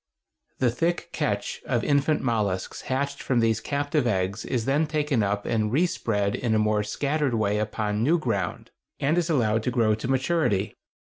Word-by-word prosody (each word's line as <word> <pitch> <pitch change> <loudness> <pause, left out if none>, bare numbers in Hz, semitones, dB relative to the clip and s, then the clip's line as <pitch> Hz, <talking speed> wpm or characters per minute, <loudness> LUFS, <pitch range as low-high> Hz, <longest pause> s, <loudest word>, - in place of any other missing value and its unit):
The 125 -3 +2
thick 170 +8 -1
"catch" - - -2
of - - -1
infant 145 +1 +2
mollusks 105 -7 -1
hatched 140 +2 -1
from 125 -3 +1
these 115 -2 +2
captive 145 +2 -1
eggs 95 -1 -1
is 120 -4 -1
then 145 +4 +2
taken 150 -5 0
up 100 0 -1
and 110 -2 0
respread 115 - +1
in 115 -3 0
a - - +4
more 105 0 +2
scattered 140 +5 -1
way 105 -1 +1
upon 105 0 -1
new 155 +9 +3
ground, 110 - -3 0.3
and 145 +4 +2
is 175 -1 0
allowed 115 -7 +2
to 115 - -1
grow 115 -3 +2
to 110 +2 -3
maturity. 130 - +1
120 Hz, 170 wpm, -26 LUFS, 105-145 Hz, 0.3 s, a